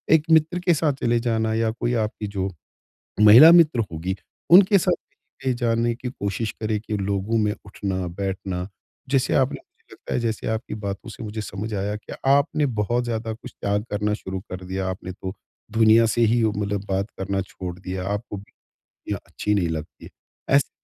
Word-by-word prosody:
एक 155 - +2
मित्र 160 +2 +4
के 175 -1 +3
साथ 155 -1 +1
चले 120 0 +3
जाना 110 -2 0
या 115 0 +1
कोई 120 - 0
आपकी 105 0 -4
जो 100 -1 -2 0.7
महिला 115 +10 +10
मित्र 165 -7 +6
होगी, 85 +4 -3 0.4
उनके 195 +3 +8
साथ 180 0 +2
कहीं-कहीं 130 -2 -6
जाने 115 0 +1
की 125 +1 -5
कोशिश 105 -2 -3
करें 110 -1 0
कि 105 0 -4
लोगों 100 +3 -1
में 105 -1 +1
उठना-बैठना। 95 -1 -3 0.4
जैसे 135 -2 +2
आपने 135 +1 +2
मुझे - - -22
लगता - - -7
है - - +1
जैसे 115 -2 -2
आपकी 110 +2 -3
बातों 100 +3 -5
से 115 - -9
मुझे 110 0 -5
समझ 105 +2 -5
आया 100 +1 -2
कि 105 - -10 0.2
आपने 145 +2 +3 0.2
बहुत 120 +4 0
ज़्यादा 115 -1 -3
कुछ 120 +3 -11
त्याग 100 0 -2
करना 105 0 0
शुरू 95 -2 -5
कर 90 0 -6
दिया, 95 +1 -3
आपने 95 0 -5
तो 95 +1 -6 0.4
दुनिया 110 +1 +5
से 115 +2 0
ही 115 +1 +3
उ 110 - +3
मतलब 100 -1 -2
बात 95 +2 -1
करना 95 0 -1
छोड़ 90 -1 -7
दिया, 95 0 -5
आपको 105 +1 -3
भी 100 - -13 0.4
दुनिया - - -6
अच्छी 105 - -2
नहीं 90 -4 +1
लगती 80 -1 -6
है। - - -11 0.5
ऐसे 140 - +3
105 Hz, 185 wpm, -23 LUFS, 95-120 Hz, 0.7 s, महिला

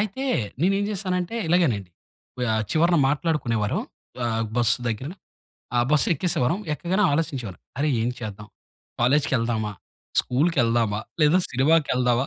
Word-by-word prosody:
అయితే, 215 +6 -2 0.4
నేనేం 195 +4 +2
జేశానంటే, 185 0 -2
ఇలాగేనండి, 130 - +2 0.5
వ్ - - -2
ఆహ్, 110 - +1
చివరన 170 +2 +3
మాట్లాడుకునేవారం, 135 - 0 0.5
ఆహ్, 115 -1 0
బస్సు 120 0 +3
దగ్గర. 115 +6 -3 0.7
ఆహ్, 120 0 +3
బస్సెక్కేసేవారం. 150 0 +2 0.2
ఎక్కగానే 185 +6 0
ఆలోచించేవారం. 135 - -2 0.2
అరే! 150 +2 +1
ఏం 115 - 0
చేద్దాం? 105 -2 -7 0.5
కాలేజ్‌కెళ్దామా? 120 -5 +1 0.5
స్కూల్‌కెళ్దామా? 120 -7 +1 0.2
లేదా 150 +4 +5
సినిమాకెళ్దావా? 130 -3 +2
135 Hz, 110 wpm, -24 LUFS, 115-170 Hz, 0.7 s, లేదా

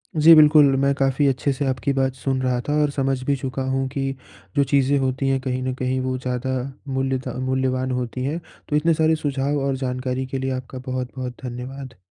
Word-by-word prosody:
जी, 160 +2 +8
बिल्कुल 150 0 +7 0.2
मैं 140 0 +3
काफ़ी 135 +1 +1
अच्छे 135 +1 +1
से 140 +2 -2
आपकी 130 0 0
बात 135 -1 +1
सुन 130 0 -1
रहा 125 -1 +1
था 145 - +2
और 150 - +2
समझ 135 -1 0
भी 140 +1 +1
चुका 130 0 -4
हूँ 135 0 0
कि 135 -1 -2 0.4
जो 140 - +4
चीज़ें 140 0 +3
होती 130 +1 0
हैं 135 0 +2
कहीं 130 0 -2
न 130 0 -1
कहीं 130 0 -1
वो 130 0 -1
ज़्यादा 130 +1 -2 0.4
मूल्यता 130 -1 -1
मूल्यवान 130 0 0
होती 125 0 -3
हैं। 150 +5 -2 0.3
तो 150 - +1
इतने 165 +3 +3
सारे 160 0 +3
सुझाव 145 -1 -1
और 135 - 0
जानकारी 125 +1 -2
के 135 +1 -3
लिए 135 0 -2
आपका 130 0 -7
बहुत-बहुत 130 -1 -4
धन्यवाद। 125 -1 -7
130 Hz, 205 wpm, -22 LUFS, 130-140 Hz, 0.4 s, जी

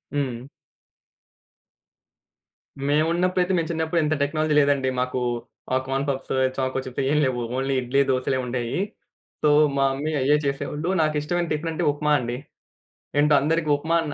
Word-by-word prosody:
హ్మ్. 130 -3 -2 2.4
మేమున్నప్పుడైతే 175 +5 +2
మేము 165 -1 -1
చిన్నప్పుడు 160 +1 0
ఇంత 155 +1 +1
టెక్నాలజీ 155 +1 0
లేదండి. 140 -2 +2
మాకు 125 0 -1 0.6
ఆ - - +4
కార్న్‌పఫ్స్, 135 0 -2 0.2
చాకోచిప్స్ 130 0 -2
ఏం 150 - +2
లేవు. 125 -2 -1 0.2
ఓన్లీ 135 +1 0
ఇడ్లీ, 130 +3 +2
దోసలే 130 +1 0
ఉండేయి. 120 +3 -2 0.6
సో - - +5 0.3
మా 135 - +3
మమ్మీ 150 +3 -3
అయ్యే 140 +3 +4
చేసేవాళ్ళు. 145 +4 -2
నాకిష్టమైన 155 +3 0
టిఫిన్ 155 +2 -1
అంటే 165 +2 -2
ఉప్మా 150 +1 -1
అండి. 120 0 -3 0.8
ఏంటో 150 +1 +4
అందరికి 155 +2 0
ఉప్మా 160 +3 -1
అన్న 150 -3 -4
145 Hz, 130 wpm, -24 LUFS, 130-155 Hz, 2.4 s, సో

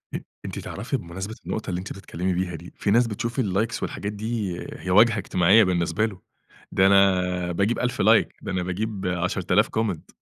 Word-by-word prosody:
أ - - -1 0.3
أنتِ - - -5
تعرفي 120 +7 -3
بمناسبة 95 +2 -7
النقطة 110 - -4
اللي 90 -1 -2
أنت 95 - -6
بتتكلمي 95 -1 -3
بيها 90 0 -2
دي، 85 +2 -11
في 100 - -1
ناس 120 +3 +4
بتشوف 115 +4 -3
الlikes 105 0 0
والحاجات 100 - -3
دي 105 -3 -3 0.2
هي 90 - -6
واجهة 110 +5 +5
اجتماعية 100 +2 +4
بالنسبة 90 +1 +1
له. 100 -5 -6 0.5
ده 95 - +4
أنا 90 -2 +3
باجيب 100 +7 0
1000 125 0 -1
like - - +5
ده - - -5
أنا 90 -1 -1
باجيب 95 +2 -3
10.000 90 0 +1
comment. 110 -7 -3
95 Hz, 180 wpm, -24 LUFS, 90-110 Hz, 0.5 s, واجهة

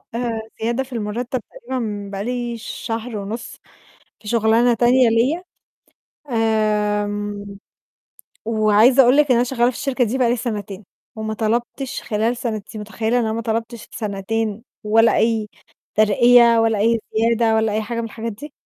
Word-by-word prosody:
آآ، 235 -2 -2 0.2
زيادة 235 +4 0
في 265 0 -13
المرتَّب 235 +3 -3
تقريبًا 220 -5 -5
بقى 200 0 -4
لي 240 -1 -3
شهر 225 0 -5
ونُص 210 +4 -6 0.7
في 210 - -9
شُغلانة 230 +2 +3
تانية 245 +2 +4
ليّا، 250 +10 +1 0.9
آمم، 210 -2 -1 0.9
وعايزة 220 +4 +5
أقول 250 +3 +4
لِك 300 - +6
إن - - +5
أنا 240 - +3
شغّالة 245 -1 +1
في - - -14
الشركة 270 -3 0
دي 240 +3 -1
بقى 250 -3 +2
لي 240 - +2
سَنتين 205 -4 -5 0.3
وما 220 0 -4
طلبتش 235 +4 -2
خلال 230 +1 -1
سَنتين، 235 -1 -2
أنتِ 215 +1 -8
متخيّلة 230 +3 0
إن - - +1
أنا 220 0 -1
ما 230 - -3
طلبتش 230 0 -4
سَنتين 215 +1 -3 0.2
ولا 225 +2 +4
أي 225 -2 +1 0.5
ترقية 235 +2 +5
ولا 225 -2 +2
أي 230 +2 +2 0.2
زيادة 230 0 +2
ولا 220 -1 +1
أي 215 - 0
حاجة 230 +2 -5
من 230 - -2
الحاجات 230 +1 -5
دي؟ 285 +8 -10
225 Hz, 160 wpm, -20 LUFS, 215-240 Hz, 0.9 s, لِك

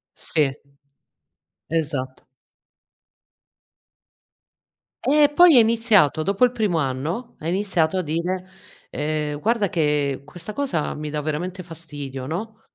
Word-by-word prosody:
Sì, 140 -3 +2 1.1
esatto. 145 -5 -3 2.8
Eh 295 +1 +4
poi 350 -6 +8
è - - +10
iniziato 220 - +3
dopo 200 +7 +3
il 245 - -1
primo 210 -8 0
anno, 150 - -3
ha 160 - -4
iniziato 185 -3 0
a 185 - +1
dire: 175 +4 -2 0.4
"Ehm, 150 0 -2
guarda 220 0 +1
che 150 -5 0
questa 175 +7 -8
cosa 190 - -1
mi 150 0 -5
dà 150 - -3
veramente 175 +5 -3
fastidio", 145 -6 -8
no, 215 +9 -6
165 Hz, 115 wpm, -22 LUFS, 150-210 Hz, 2.8 s, è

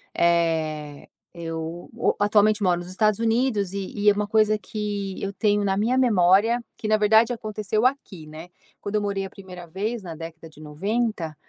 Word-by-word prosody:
eh, 160 -4 0 0.2
eu 165 0 -6
o - - 0
atualmente 210 0 +3
moro 175 -2 +2
nos 175 - -7
Estados 215 +2 +1
Unidos 225 -4 +1
e 195 -1 -5
e 210 0 +3
é 205 - +5
uma 210 0 -1
coisa 215 0 +3
que 205 -2 -5
eu 195 - -3
tenho 205 0 +1
na 195 - +1
minha 230 +6 +1
memória, 220 0 +3
que, 215 - -5
na 215 - +4
verdade, 220 +3 +4
aconteceu 215 0 -2
aqui, 220 - -1
né, 155 +3 -10 0.3
quando 205 +1 -5
eu 210 - +2
morei 200 -1 -2
a - - -7
1ª 185 -3 -11
vez 210 +6 -3
na 170 -3 -8
década 165 0 -9
de 155 - -16
90. 175 +1 -2
200 Hz, 185 wpm, -24 LUFS, 170-215 Hz, 0.3 s, é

